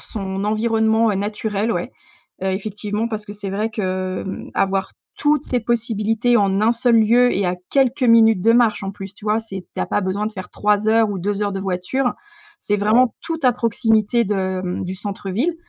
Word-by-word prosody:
son 195 -2 -5
environnement, 220 +1 +2
heu, 205 - 0
naturel, 210 +2 -2
ouais. - - -3 0.5
Heu, 190 - 0
effectivement 210 +3 -3
parce 215 -2 -5
que 205 - -8
c'est 205 -1 -6
vrai 215 +3 -1
que, 185 -3 -3
mmh, 190 - -6
avoir 195 0 0 0.3
toutes 295 -1 +1
ces 250 - -1
possibilités 230 0 +1
en 200 -2 +2
1 220 +2 +4
seul 240 0 +2
lieu 245 +3 +4
et 195 -1 0
à 180 0 -1
quelques 265 -1 +2
minutes 225 -5 +5
de 230 - +5
marche, 230 -3 +3
en 195 - -3
plus, 195 0 -9
tu - - -15
vois? 215 +1 +1
C'est 195 -5 -8
tu - - -3
as - - -1
pas 205 - 0
besoin 195 +3 -1
de 220 - -4
faire 185 -3 -8
3 210 +1 +1
heures 225 0 +4
ou 200 - -3
2 205 +3 -2
heures 205 - -1
de 195 - -3
voiture. 195 +8 -1 0.5
C'est 205 - -1
vraiment 220 +4 +3
tout 330 -1 -3
à 250 - +5
proximité 225 -1 +1
de, 190 -2 -1
mmh, 180 0 -3
du 185 - -4
centre-ville 205 - -2
210 Hz, 205 wpm, -20 LUFS, 195-230 Hz, 0.5 s, minutes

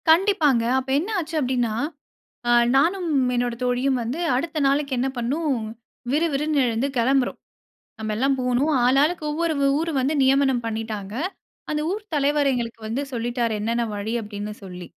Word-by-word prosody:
கண்டிப்பாங்க. 320 - +4 0.2
அப்ப 265 0 -7
என்ன 360 +8 -4
ஆச்சு 325 -1 -5
அப்டீன்னா, 250 -4 0 0.8
அ - - +2 0.3
நானும் 345 +6 +2 0.3
என்னோட 245 -1 0
தோழியும் 250 +1 +1
வந்து 245 +8 -3 0.2
அடுத்த 315 +5 -2
நாளைக்கு 280 0 +1
என்ன 250 +2 +1
பண்ணோம், 265 0 -1 0.5
விறுவிறுன்னு 300 -1 +1
எழுந்து 235 +3 0
கெளம்புறோம். 260 +2 +2 0.6
நம்மெல்லாம் 220 +6 0
போகணும், 250 +4 +1
ஆளாளுக்கு 290 +6 +3
ஒவ்வொரு 325 +1 0
வ - - +2
ஊரு 330 +1 -1
வந்து 270 +4 0
நியமனம் 265 -2 +3
பண்ணீட்டாங்க. 220 -3 -4 0.6
அந்த 300 0 0
ஊர் 415 +3 -3
தலைவர் 290 0 +2
எங்களுக்கு 235 -2 -3
வந்து 235 +6 -2
சொல்லிட்டாரு. 240 -1 -1
என்னன்ன 230 +3 0
வழி 205 +2 -3
அப்படீன்னு 210 0 -6
சொல்லி. 180 -2 -8
265 Hz, 145 wpm, -23 LUFS, 235-300 Hz, 0.8 s, கண்டிப்பாங்க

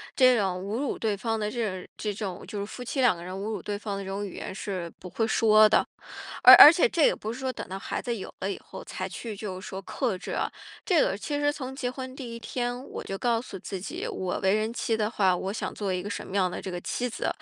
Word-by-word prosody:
这 255 -2 +6
种 185 -3 0
侮 200 +4 -3
辱 285 - -2
对 215 -3 0
方 225 +2 -2
的 210 0 -1
这 225 -4 -1
种 - - -13
这 210 -1 -2
种 195 -3 -5
就 205 0 -5
是 200 - -2
夫 250 +4 -8
妻 260 +2 -2
两 235 -8 +5
个 170 - -9
人 185 - -6
侮 190 - -5
辱 215 0 -3
对 205 -1 -3
方 205 -2 -4
的 195 - -5
这 190 - -7
种 200 +1 -3
语 195 - -8
言 - - -6
是 185 -4 -4
不 180 - -9
会 225 - 0
说 215 -1 +6
的。 - - +4 0.6
而 - - +12
而 300 - +12
且 365 +8 +3
这 335 - 0
个 - - +8
也 - - +1
不 220 +2 -5
是 255 - -8
说 260 -1 -1
等 - - -7
到 190 - -5
孩 - - -4
子 240 -2 -2
有 190 - -7
了 195 - -1
以 - - -3
后 - - -9
才 185 - -5
去 215 +3 -6
就 190 -3 -5
是 - - -10
说 190 - -5
克 220 +1 -2
制 - - -7
啊， - - 0 0.4
这 350 -6 +3
个 190 - +1
其 290 +6 -3
实 290 0 +2
从 265 -2 -6
结 250 -2 -2
婚 260 0 -7
第 240 -4 -6
一 - - -6
天， 245 +2 -3
我 - - -6
就 195 - -4
告 235 -2 +1
诉 200 -5 -8
自 195 0 -6
己， 185 - -5
我 185 -1 -3
为 190 +1 +3
人 215 +1 0
妻 230 -1 -1
的 210 -1 0
话， 190 -5 +3
我 190 +2 -3
想 210 - -3
做 200 -3 -2
一 180 - -2
个 205 - -6
什 - - -5
么 190 - -9
样 185 -2 +2
的 - - -5
这 190 - -6
个 175 - -4
妻 245 +7 -2
子。 230 - -3
215 Hz, 315 characters per minute, -27 LUFS, 190-245 Hz, 0.6 s, 而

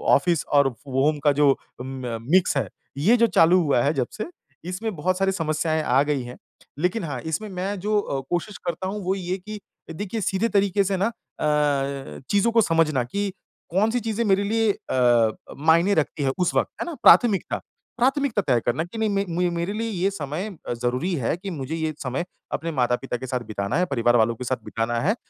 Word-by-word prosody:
Office 175 -3 +1
और 140 -2 +3
व 130 +2 -5
home 150 +2 +2
का - - +7
जो 145 -1 +6
अ, - - -11 0.3
म 130 -3 -5
मिक्स 180 -5 +4
है। 125 -7 0 0.3
ये 205 +13 +4
जो 235 0 +4
चालू 175 +3 +6
हुआ 140 -7 +2
है 145 - +2
जब 130 -5 0
से 215 - -2 0.4
इसमें 205 +3 -3
बहुत 180 +4 0
सारी 195 0 +2
समस्याएँ 155 -2 0
आ 130 -1 +3
गई 145 -3 -1
हैं। 120 +1 -9 0.4
लेकिन 180 +6 0
हाँ 140 -6 -4
इसमें 160 +7 -3
मैं 190 +2 -3
जो 210 +3 +1
अ, 140 -9 -2
कोशिश 175 +4 -2
करता 175 +2 -2
हूँ 205 +1 -4
वो 185 +2 0
ये 180 -2 -5
है 185 - 0
कि 210 +3 -8 0.3
देखिए 205 +6 -4
सीधे 195 +4 0
तरीके 200 -1 +2
से 195 0 0
ना 195 +3 +2
अ, 140 - -1
चीज़ों 205 +3 +3
को 230 0 +5
समझना 165 - +2
कि 200 +11 -2 0.4
कौन-सी 215 +7 +2
चीज़ें 225 0 -1
मेरे 200 -1 +3
लिए 220 +1 +2
अ, 120 - +2 0.3
मायने 170 +5 +5
रखती 155 -1 0
हैं 135 - +2
उस 180 - +1
वक़्त - - +2
है - - -1
ना? 345 - -5
प्राथमिकता, 220 -6 +5 0.4
प्राथमिकता 265 -2 +2
तय 125 -3 +4
करना 125 +6 +1
कि 175 +6 -9
नहीं 205 -3 +1 0.2
म - - -4
मेरे 170 +4 -2
लिए 225 +2 -2
ये 195 -2 0
समय 165 +3 -4 0.2
अ, - - 0
ज़रूरी 125 +9 -1
है 130 -2 0
कि 195 +2 -6
मुझे 155 -3 -4
ये 160 -1 -2
समय 135 +6 -2 0.3
अपने 165 +1 -2
माता-पिता 125 +1 0
के 130 - -7
साथ 125 0 -1
बिताना 100 +3 -2
है, 180 - +2
परिवार 120 -6 +2
वालों 115 +1 +2
के 125 - -7
साथ 130 +1 -2
बिताना 115 +1 -1
है। 200 - +2
170 Hz, 210 wpm, -24 LUFS, 135-200 Hz, 0.4 s, का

